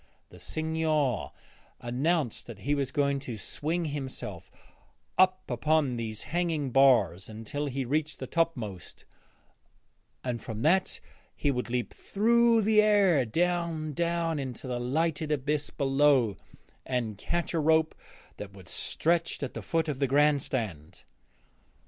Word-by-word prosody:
'The - - -13
Signor' 155 -6 0 0.5
announced 135 +2 -1
that 110 -4 -10
he 145 - 0
was 140 -2 -1
going 140 -2 +1
to 120 -4 -6
swing 165 - -2
himself 130 - -5 0.7
up 185 0 +4
upon 140 +2 +1
these 110 -2 -4
hanging 165 -5 -1
bars 115 -10 +4
until 115 +7 -4
he 135 -1 -2
reached 155 +4 -1
the - - -5
topmost, 120 - -3 1.2
and 120 -3 -3
from 110 0 -5
that 185 +5 +2 0.4
he 145 - +1
would 125 -2 -3
leap 125 0 -2
through 230 +2 +3
the 215 +1 +5
air 200 -9 +4
down, 165 +2 -1
down 170 0 0
into 130 -2 -6
the 125 -1 -2
lighted 155 +4 -1
abyss 150 +1 0
below, 135 -6 +3 0.5
and 115 -5 -2
catch 175 0 -2
a 165 - +1
rope 160 +1 +3 0.4
that 100 -1 -8
was 95 -3 -9
stretched 170 -2 0
at 130 - -4
the - - -5
foot 165 -1 0
of 145 -4 -3
the 140 - +2
Grand 145 +1 +4
Stand. 95 - -4
145 Hz, 135 wpm, -29 LUFS, 125-165 Hz, 1.2 s, the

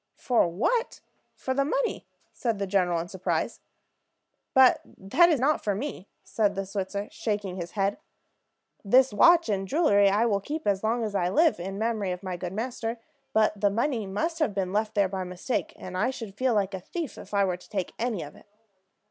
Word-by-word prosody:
"For 240 -8 +2
what? 350 - -1 0.4
For 260 - -3
the 275 +1 +2
money," 480 - -1 0.3
said 230 -4 -1
the 200 - -2
general, 180 -3 +1
in 170 - -7
surprise. 185 +1 -2 1.0
"But 260 -1 +6 0.2
that 285 - +4
is 310 -6 +2
not 290 +5 +1
for 205 -2 0
me," 220 -4 -5 0.2
said 205 -3 0
the 195 0 -2
Switzer, 200 +1 -4
shaking 205 -4 -3
his 175 -2 -6
head. 200 +4 0 0.8
"This 250 +3 +4
watch 335 - +6
and 200 -3 0
the 195 - -6
jewelry 205 - +4
I 210 +4 +2
will 205 -4 +2
keep 310 +8 -5
as 200 -1 +1
long 230 +2 +1
as 215 -2 -3
I 180 -3 +1
live, 315 - +3
in 195 +3 -5
memory 220 -3 -1
of 180 +2 -5
my 185 -1 -3
good 175 0 -5
master; 230 +2 -3 0.3
but 215 -1 +2
the 205 - +4
money 230 0 -1
must 325 - -2
have 290 -11 0
been 190 -1 -1
left 215 +1 0
there 200 -2 +3
by 190 0 -4
mistake, 180 +7 -3
and 185 - -8
I 215 +7 +1
should 225 -6 -6
feel 255 +2 +1
like 200 -1 0
a 190 - -3
thief 315 - -6
if - - -12
I 200 -1 +3
were 180 -2 -1
to 180 - -18
take 190 -4 -3
any 225 -5 -1
of 145 - -11
it." - - -18
205 Hz, 205 wpm, -27 LUFS, 190-250 Hz, 1.0 s, But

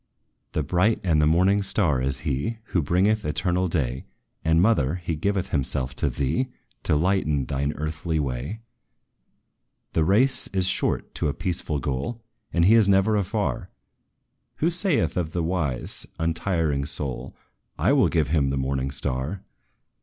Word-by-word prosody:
"'The 75 - 0
bright 95 +9 +2
and 80 -5 +2
the 75 - +4
morning 95 +5 +3
star' 85 -9 +1
is 65 0 0
he, 75 - -2
Who 85 - +1
bringeth 95 +8 +2
eternal 90 +4 0
day! 65 -6 -2 0.4
And, 80 +1 +3
mother, 90 - +3
he 85 -2 -3
giveth 95 +3 -1
himself 65 -3 -1
to - - +1
thee, 75 - -1 0.4
To - - +3
lighten 75 -4 +1
thine 70 +2 -1
earthly 75 +1 -3
way. 70 - -3 1.3
"The 80 - +2
race 115 +11 +3
is 95 -1 -1
short 95 - -1
to - - -1
a 70 - -2
peaceful 85 -5 -1
goal, 70 - -3 0.3
And 85 0 +3
He 105 - +6
is 110 -3 +5
never 100 +2 +4
afar, 100 0 -1 0.9
Who 165 +3 +1
saith 170 - +1
of 80 -3 -2
the 85 - -1
wise, 80 -7 -2
untiring 80 -3 0
soul, 70 -4 -4 0.4
'I - - +3
will - - +4
give 80 -4 +1
him 75 -3 +2
the 70 - -1
morning 65 0 -1
star!' 70 +5 -2
80 Hz, 155 wpm, -25 LUFS, 70-95 Hz, 1.3 s, He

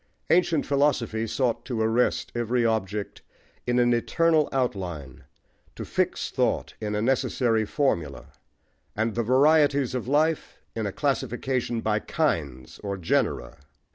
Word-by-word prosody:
Ancient 170 -3 +3
philosophy 130 -6 +1
sought 120 +1 -1
to 125 -3 -3
arrest 115 +3 +1
every 120 0 0
object 105 -2 -2 0.5
in 120 0 +1
an 120 0 +4
eternal 155 +6 +2
outline, 90 - -3 0.5
to - - -6
fix - - -1
thought - - 0
in 105 -1 -2
a 105 - -1
necessary 120 -3 +1
formula, 85 - -1 0.7
and 110 +1 0
the 120 - 0
varieties 140 +2 +3
of 125 -2 -3
life 155 +3 +1 0.2
in 110 -2 -2
a - - -3
classification 130 -2 -1
by 110 -1 +1
"kinds," 75 - -2
or 100 -1 -4
genera. 80 -7 -1
120 Hz, 130 wpm, -26 LUFS, 105-135 Hz, 0.7 s, an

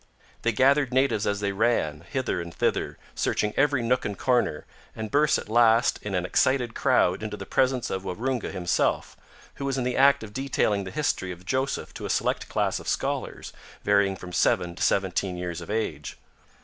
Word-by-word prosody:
They 115 - +1
gathered 135 +3 +3
natives 130 -5 +2
as 100 0 -1
they 100 -1 0
ran, 95 -8 0
hither 130 -9 -1
and 85 0 -7
thither, - - -1 0.2
searching 105 0 0
every 140 -3 +2
nook 125 +2 +1
and 100 - -4
corner, 120 - +1 0.3
and 110 -1 -5
burst 150 +1 +3
at - - -7
last 115 +1 +4
in 105 -2 -4
an 90 -1 0
excited 125 +4 +1
crowd 120 -10 +2
into 105 -1 -5
the - - -7
presence 130 -2 +1
of 95 0 -3
Waroonga 120 +6 -2
himself, 90 -2 0 0.4
who 140 - -4
was 135 -1 -1
in 130 - 0
the 125 0 -1
act 140 -2 +5
of 105 -1 -9
detailing 110 -6 0
the - - -5
history 95 -7 -1
of 90 0 -10
Joseph 130 +6 -2
to - - -6
a - - -9
select - - 0
class - - 0
of - - -11
scholars, - - -3 0.3
varying 100 -1 +3
from 90 -1 -10
seven 90 -2 +2
to - - -11
seventeen 95 -1 0
years 90 -2 -4
of - - -10
age. 110 +1 -3
110 Hz, 190 wpm, -26 LUFS, 95-130 Hz, 0.4 s, act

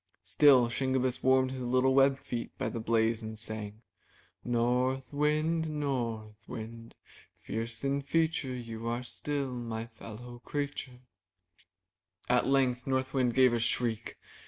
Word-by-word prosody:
Still 135 -5 +6
Shingebiss 130 +1 0
warmed 130 0 +4
his 130 -1 -5
little 130 +2 +2
webbed 135 0 +5
feet 120 -3 -6
by - - -1
the 115 - -4
blaze 115 0 +1
and 110 0 -6
sang: 110 0 -6 0.6
'^North 125 +3 0
Wind, 155 +2 +1
North 115 -8 -3
Wind, 115 +1 -8 0.4
Fierce 115 +2 -5
in 140 +1 0
feature, 150 -2 0
You 115 -2 -6
are 120 +1 -1
still 140 +1 -3
my 115 -2 -4
fellow 120 +1 -10
creature/' 140 -3 -4 1.3
At 125 0 +3
length 130 -2 +2
North 130 0 0
Wind 125 -3 +1
gave 130 -2 +6
a 120 - +1
shriek. 115 -1 -1
125 Hz, 135 wpm, -31 LUFS, 115-135 Hz, 1.3 s, Still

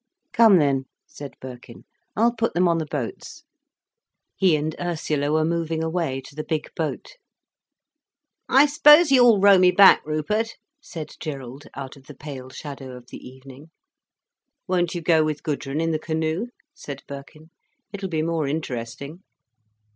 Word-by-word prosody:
"Come 225 -4 +6
then," 140 -4 +1 0.2
said 140 -2 -10
Birkin. 125 -2 -11 0.3
"I'll 235 +2 +2
put 230 -1 -2
them 180 +1 +3
on 170 -1 +1
the 160 - -4
boats." 140 -7 -6 0.9
He 185 -4 +3
and 155 +1 -3
Ursula 155 -4 -2
were 155 0 +2
moving 165 -1 -2
away 160 -5 -2
to 135 - -14
the 155 +1 -5
big 155 -2 -4
boat. 165 - -5 1.3
"I 270 +3 +6
suppose 295 +2 +6
you'll 245 -5 +6
row 200 -1 +6
me 180 0 +6
back, 195 +1 +6
Rupert," 210 +10 -2 0.3
said 160 - -8
Gerald, 135 -3 -7
out 135 0 -8
of 135 0 -19
the 150 - -11
pale 135 -4 -9
shadow 135 -2 -9
of 125 -1 -16
the - - -8
evening. 130 +3 -14 1.0
"Won't 175 -2 0
you 170 - -4
go 160 -1 +4
with 155 -1 -3
Gudrun 145 -1 -3
in 165 0 0
the 155 - -1
canoe?" 160 +6 -2 0.3
said 140 - -9
Birkin. 145 +3 -11 0.4
"It'll 195 -1 -5
be 160 -2 -1
more 165 -3 -1
interesting." 140 +1 -5
155 Hz, 155 wpm, -23 LUFS, 140-180 Hz, 1.3 s, Come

